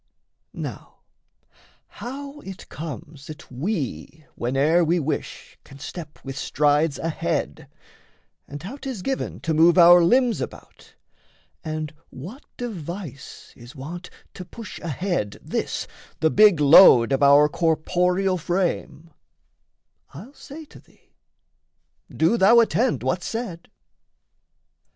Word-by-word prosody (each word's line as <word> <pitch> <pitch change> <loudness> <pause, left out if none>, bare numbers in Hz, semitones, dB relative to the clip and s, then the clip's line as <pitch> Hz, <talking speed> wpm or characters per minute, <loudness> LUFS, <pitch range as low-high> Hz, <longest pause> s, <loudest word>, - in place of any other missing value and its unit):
Now, - - -8 0.8
how 280 +3 -9
it 195 -8 -11
comes 155 -2 -9
that 155 0 -11
we, 150 - -4
Whene'er 140 +8 +2
we 170 +2 +1
wish, 155 0 -5
can 135 - -15
step 150 +2 -9
with 135 0 -6
strides 145 +1 +1
ahead, 165 - -3 0.8
And 145 +2 -9
how 225 +10 -7
'tis 260 -9 -6
given 270 -1 -3
to 160 - -1
move 165 +3 +5
our 175 0 +8
limbs 245 +5 +2
about, - - -10 0.7
And 155 -2 -5 0.2
what 190 - -10
device 175 - -8
is 120 +3 -14
wont 170 +6 -8 0.2
to 185 - -8
push 215 +4 -10
ahead 170 - -3
This - - -3 0.3
the 160 - +2
big 205 -6 +5
load 140 -5 +7
of 135 - +1
our 140 +1 +6
corporeal 180 +4 0
frame, 170 -2 -3 1.0
I'll 215 - -11
say 300 +2 -11
to - - -16
thee - - -28 1.0
do 165 +9 +1
thou 230 +4 +6
attend 235 +2 +1
what's 180 0 -2
said. 220 -8 -6
170 Hz, 115 wpm, -23 LUFS, 150-195 Hz, 1.0 s, our